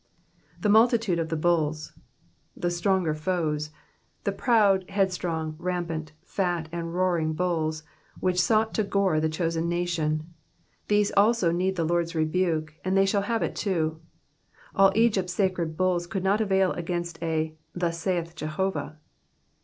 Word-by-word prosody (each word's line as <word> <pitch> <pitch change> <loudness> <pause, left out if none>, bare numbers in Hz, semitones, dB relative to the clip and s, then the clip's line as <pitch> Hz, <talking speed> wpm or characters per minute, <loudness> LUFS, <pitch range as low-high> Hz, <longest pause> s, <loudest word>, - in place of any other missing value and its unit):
^^The 210 - +3
multitude 220 -5 +4
ofthebtUlSj^^ 160 -1 0 0.7
the 175 - -1
stronger 175 -2 +1
foes; 155 -2 -1 0.5
the - - 0
proud, 200 -6 +3
headstrong, 180 -5 -1
rampant, 170 -3 -3
fat, 175 -4 -1
and 170 0 -4
roaring 175 -4 +1
bulls, 160 -2 -1 0.4
which 180 -1 +2
sought 220 +3 +2
to 215 - +1
gore 195 -5 +1
the 160 0 +1
chosen 165 +1 -1
nation, 170 -2 -1 0.3
— - - -40
these 210 -1 +2
also 205 -3 +4
need 185 +2 0
the 165 -2 0
Lord's 170 0 0
rebuke, 155 -1 0
and 190 +1 +1
they 195 - +5
shall 200 +1 +1
have 225 +3 -1
it - - -2
too. 160 -6 -1 0.7
All 195 0 +5
Egypt's 205 -6 +2
sacred 180 -5 -1
bulls 180 -2 +1
could 185 +1 -3
not 200 +3 +2
avail 190 -3 +2
against 170 -1 -4
a 160 -1 -1 0.2
thus 170 -1 -1
saith 170 -1 -1
Jehovah." 155 0 -3
175 Hz, 140 wpm, -26 LUFS, 160-190 Hz, 0.7 s, they